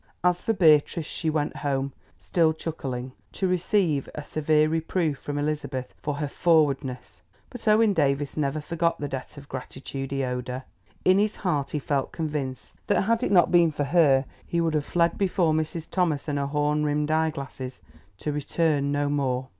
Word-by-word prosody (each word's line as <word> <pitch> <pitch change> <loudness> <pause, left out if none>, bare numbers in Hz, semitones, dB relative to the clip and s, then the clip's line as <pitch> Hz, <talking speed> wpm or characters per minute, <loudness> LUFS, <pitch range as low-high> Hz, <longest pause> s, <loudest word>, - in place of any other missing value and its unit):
As 180 0 +2
for - - 0
Beatrice, 160 -3 +4
she 160 - -3
went 150 -1 -1
home, 140 -1 -1 0.2
still 165 -3 +2
chuckling, 135 -6 -5 0.2
to 190 - 0
receive 180 -5 +1
a 150 - -5
severe 155 +1 +2
reproof 160 -1 -1
from 145 0 -4
Elizabeth 145 -3 -3
for 150 -1 -2
her 145 0 -2
"forwardness." 140 -5 +1 0.3
But 245 -2 -9
Owen 215 0 +5
Davies 140 -4 +1
never 150 0 0
forgot 170 +1 0
the 145 - -2
debt 135 +2 -6
of 140 0 -11
gratitude 135 +1 -6
he 135 -1 -1
owed 125 -1 -3
her. 130 +1 -4 0.4
In 185 +1 +5
his 210 +1 +1
heart 150 -8 -1
he - - -2
felt 140 -1 -1
convinced 150 -5 -4
that - - +3
had 230 +3 +1
it 250 - 0
not 180 -3 +5
been 170 -2 +5
for 145 - -2
her, 140 -3 +4 0.2
he 170 - 0
would 165 -1 +1
have 150 -2 0
fled 170 -1 +1
before 180 -4 +2
Mrs. 160 +1 -2
Thomas 165 -7 0
and 145 -1 -1
her 140 - -1
horn 150 +1 +1
rimmed 150 0 0
eyeglasses, 140 -5 -2 0.4
to 150 - -3
return 145 -1 0
no 145 0 +1
more. 130 -3 -1
150 Hz, 180 wpm, -26 LUFS, 140-170 Hz, 0.4 s, Owen